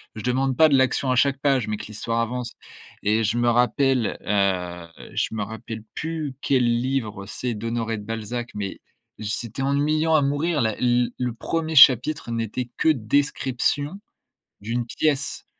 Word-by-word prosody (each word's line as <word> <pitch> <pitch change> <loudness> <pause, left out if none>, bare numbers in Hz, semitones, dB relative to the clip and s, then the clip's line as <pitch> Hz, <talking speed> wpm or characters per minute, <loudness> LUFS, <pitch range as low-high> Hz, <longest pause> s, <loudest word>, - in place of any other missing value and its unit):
Je 110 - -6
demande 130 +1 +1
pas 160 -1 +7
de 140 - +4
l'action 130 0 +1
à 125 - +2
chaque 135 +1 +2
page 135 -6 +1
mais 105 - -2
que - - -8
l'histoire 115 +2 -3
avance 120 +1 -2 0.5
et 110 +2 +2
je 110 +3 0
me 120 0 +3
rappelle, 125 0 +2
heu, 90 -4 0 0.3
je - - -1
me 110 - -2
rappelle 110 +1 -7
plus, 155 -4 -4
quel 130 -3 +2
livre 120 -4 -1
c'est 120 +4 -4
d'Honoré 115 +1 -2
de 105 - -8
Balzac 115 +2 -4
mais, 100 -2 -5 0.4
c'était 115 +4 -4
ennuyant 155 +3 +2
à 145 - +4
mourir 145 +3 0
la 110 -2 0
l 120 -1 +2
le 125 -2 -1
1er 160 +6 -3
chapitre 140 0 +6
n'était 115 +2 -3
que - - +3
description, 145 - 0 0.6
d'une 115 +3 -2
pièce, 145 +3 -1
125 Hz, 160 wpm, -24 LUFS, 110-140 Hz, 0.6 s, pas